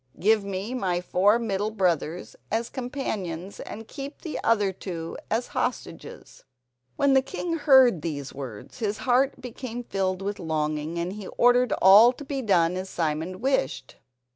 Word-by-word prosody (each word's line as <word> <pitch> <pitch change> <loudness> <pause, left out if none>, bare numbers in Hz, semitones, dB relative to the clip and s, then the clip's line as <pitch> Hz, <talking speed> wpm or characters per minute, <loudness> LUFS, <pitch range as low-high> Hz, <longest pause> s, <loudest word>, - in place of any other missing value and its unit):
Give 215 +2 +3
me 200 +4 -4
my 185 -8 0
four 190 +4 +3
middle 210 -3 -1
brothers 180 -5 -1 0.2
as 230 +2 -1
companions, 200 - -4
and 225 +1 -8
keep 275 +4 -8
the 320 - -5
two - - -3
others 190 -6 -1
as 230 +3 0
hostages." - - -5 0.5
When 280 -1 +3
the 265 - +5
king 345 +4 -4
heard 265 - +5
these 145 -4 -5
words 130 - -9
his 210 -2 -1
heart 260 +2 +2
became 245 -1 -6
filled 190 -3 -2
with 205 +1 -3
longing, 155 -1 -2
and 170 +2 -2
he 205 -2 -8
ordered 245 0 +3
all 210 +6 +8
to 290 - -10
be 275 -1 -3
done 180 -6 +2
as 185 +1 -5
Simon 165 +3 -2
wished. 135 - -1
200 Hz, 155 wpm, -26 LUFS, 175-245 Hz, 0.5 s, all